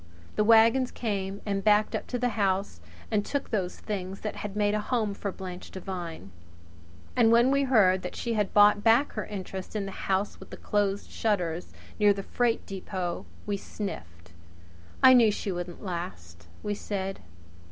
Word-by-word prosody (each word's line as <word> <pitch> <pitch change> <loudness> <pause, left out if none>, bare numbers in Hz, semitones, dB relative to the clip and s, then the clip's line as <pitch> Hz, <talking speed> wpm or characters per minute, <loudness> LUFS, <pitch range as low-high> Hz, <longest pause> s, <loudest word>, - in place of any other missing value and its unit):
The 210 - +3
wagons 230 +3 +5
came 200 -3 -3
and 200 -2 -1
backed 210 0 +4
up - - -4
to 250 - -2
the 245 0 +1
house 195 - 0 0.3
and 210 -1 +2
took 285 +6 -3
those 190 -5 -2
things 195 -2 -5
that 215 - -4
had 205 -1 -5
made 205 0 +2
a 210 - +1
home 215 -3 -1
for 200 0 -4
Blanche 185 -1 -8
Devine. 175 - -6 0.8
And 235 -3 +5
when 240 +3 +5
we 275 0 +3
heard 195 -8 +4
that 180 - -6
she 235 - -2
had 210 -3 0
bought 205 0 +6
back 235 +5 +4
her 215 - -4
interest 190 -1 -6
in 205 -2 -1
the 195 - -5 0.2
House 195 +2 0
With - - -12
the - - -9
Closed 205 -1 -1
Shutters, 180 -6 -1 0.3
near 205 -1 +6
the 195 0 -6
freight 240 +1 0
depot, 185 -2 -4 0.2
we 205 -1 -1
sniffed. 85 - -7 0.7
"I 260 - +10
knew 235 -3 +7
she 205 -1 -3
wouldn't 175 +1 -6
last!" 85 - -6 0.2
we 210 - -1
said. 195 -2 -4
205 Hz, 175 wpm, -28 LUFS, 185-220 Hz, 0.8 s, I